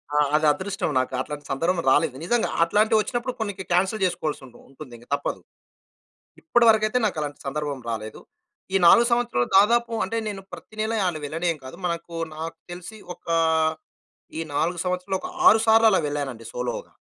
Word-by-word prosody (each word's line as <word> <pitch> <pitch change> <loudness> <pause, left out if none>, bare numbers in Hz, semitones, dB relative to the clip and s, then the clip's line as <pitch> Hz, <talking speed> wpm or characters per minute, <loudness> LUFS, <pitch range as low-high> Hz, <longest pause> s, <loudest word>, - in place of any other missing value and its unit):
ఆ! - - +3 0.2
అది 155 0 +2
అదృష్టం 195 +2 -3
నాకు. 130 0 -2
అట్లాంటి 145 +2 -7
సందర్భం 170 +6 0
రాలేదు. 130 - +2
నిజంగా! 240 +4 +1 0.2
అట్లాంటివొచ్చినప్పుడు 220 +6 +1
కొన్నికి 200 -3 -4
క్యాన్సెల్ 190 +3 +1
జేసుకోవాల్సుంటుంది 150 -8 -4
ఉంటుందింక 125 -4 -12
తప్పదు. - - -4 1.0
ఇప్పటివరకైతే 230 -4 +3
నాకలాంటి 150 -7 -3
సందర్భం 145 -2 -3
రాలేదు. 110 -1 -5 0.5
ఈ - - +5
4 235 +6 +7
సంవత్సరాలు 235 - +1
దాదాపు 235 +3 +4
అంటే, 230 - -3
నేను 200 -2 -5
ప్రతినెలా 220 +1 -4
ఆలు 160 -3 -2
వెళ్ళడేం 165 +2 -1
కాదు. 130 - -9
మనకు 170 0 -5 0.2
నాకు 165 +1 -6
తెలిసి, 180 +5 -9 0.2
ఒక - - -31 1.1
ఈ - - -1
4 170 +2 0
సంవత్సరాలు, 180 +1 -1
ఒక 365 - -6 0.2
6 220 - +5
సార్లు 225 0 +6
అలా 190 - +3
వెళ్ళానండి 135 -6 -4
సోలోగా. 125 0 -4
180 Hz, 145 wpm, -24 LUFS, 150-215 Hz, 1.1 s, 4